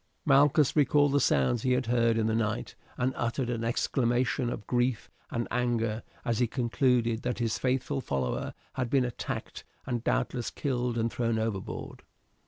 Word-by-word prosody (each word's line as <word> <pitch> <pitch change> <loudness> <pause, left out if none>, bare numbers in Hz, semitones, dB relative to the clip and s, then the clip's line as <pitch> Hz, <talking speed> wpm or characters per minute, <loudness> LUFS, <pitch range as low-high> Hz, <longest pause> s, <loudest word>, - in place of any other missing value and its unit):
Malchus 145 0 +4
recalled 145 -1 +4
the 145 - +3
sounds 105 - +2
he 130 +1 +2
had 125 0 +1
heard 115 -1 +2
in 110 - +1
the 110 - +1
night, 110 -1 -1 0.2
and 130 +1 0
uttered 120 +1 -1
an 115 -1 -2
exclamation 120 +1 +1
of 105 - -5
grief 120 -2 0 0.2
and 120 0 -2
anger 115 -2 0 0.2
as 115 -1 0
he 120 - +3
concluded 120 -1 +1
that 125 0 -2
his 115 -2 -1
faithful 135 +2 0
follower 65 - -2 0.2
had 125 -2 -2
been 130 -1 +3
attacked 120 - -5 0.2
and 120 -2 -2
doubtless 125 -1 0
killed 125 -4 -2
and 115 0 0
thrown 115 -2 0
overboard. 110 -4 -4
120 Hz, 165 wpm, -29 LUFS, 115-130 Hz, 0.2 s, Malchus